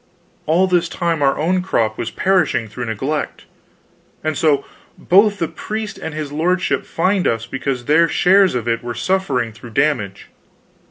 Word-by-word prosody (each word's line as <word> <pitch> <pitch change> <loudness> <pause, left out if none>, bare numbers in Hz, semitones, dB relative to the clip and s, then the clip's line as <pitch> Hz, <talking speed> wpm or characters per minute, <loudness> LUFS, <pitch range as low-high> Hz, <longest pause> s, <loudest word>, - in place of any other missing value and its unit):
All 170 +5 +4
this 175 -2 +1
time 170 -3 -1
our 135 -1 +2
own 180 +4 +1
crop 115 -12 0
was 115 - -4
perishing 185 -11 +1
through 120 +3 -6
neglect; 135 +7 -3 0.8
and 155 0 -1
so 150 -2 +2 0.3
both 200 +3 +4
the 165 - -1
priest 215 +6 -6
and 160 - -6
his 150 -2 -4
lordship 175 +4 0
fined 185 +2 +1
us 115 0 -1
because 130 -1 -3
their 160 +4 +4
shares 190 0 +4
of 120 -1 -3
it 115 0 -1
were 120 -1 -5
suffering 130 -6 0
through 120 +2 -12
damage. 125 -10 0
155 Hz, 160 wpm, -19 LUFS, 120-180 Hz, 0.8 s, All